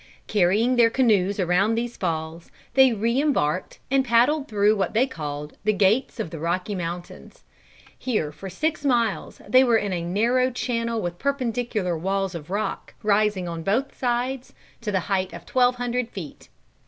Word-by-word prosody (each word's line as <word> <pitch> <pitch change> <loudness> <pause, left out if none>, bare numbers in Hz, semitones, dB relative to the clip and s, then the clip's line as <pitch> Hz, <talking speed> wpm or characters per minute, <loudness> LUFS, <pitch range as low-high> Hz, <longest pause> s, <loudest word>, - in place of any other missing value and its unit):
Carrying 210 +6 +2
their 235 -1 +6
canoes 210 -6 +2
around 185 +5 +2
these 235 +1 -3
falls, 165 -1 -4 0.2
they 265 -1 +6
re 230 +4 +1
embarked, 185 - 0
and 270 0 +4
paddled 260 +5 +3
through 210 0 +3
what 195 +1 -2
they 240 +4 +4
called 150 - -6
"The 215 +1 +2
Gates 210 +6 +2
of 160 - -3
the 165 - -6
Rocky 180 +5 -2
Mountains." 175 -1 -7 0.6
Here 210 - -1
for 175 +6 -9
six 305 - -2
miles 235 - 0
they 255 +5 +6
were 235 -3 +4
in 205 -3 -2
a 175 - -2
narrow 230 +9 +1
channel 235 -2 -2
with 175 0 -4
perpendicular 240 -9 -1
walls 195 +3 -1
of 165 -1 -8
rock, 205 +3 -3
rising 210 -3 +2
on 165 -1 -5
both 225 - -1
sides 250 +1 -2 0.3
to 215 -2 -3
the 190 -2 +1
height 190 0 -1
of - - -9
twelve 250 -1 +3
hundred 245 -1 -2
feet. 165 -7 -9
210 Hz, 165 wpm, -24 LUFS, 180-245 Hz, 0.6 s, their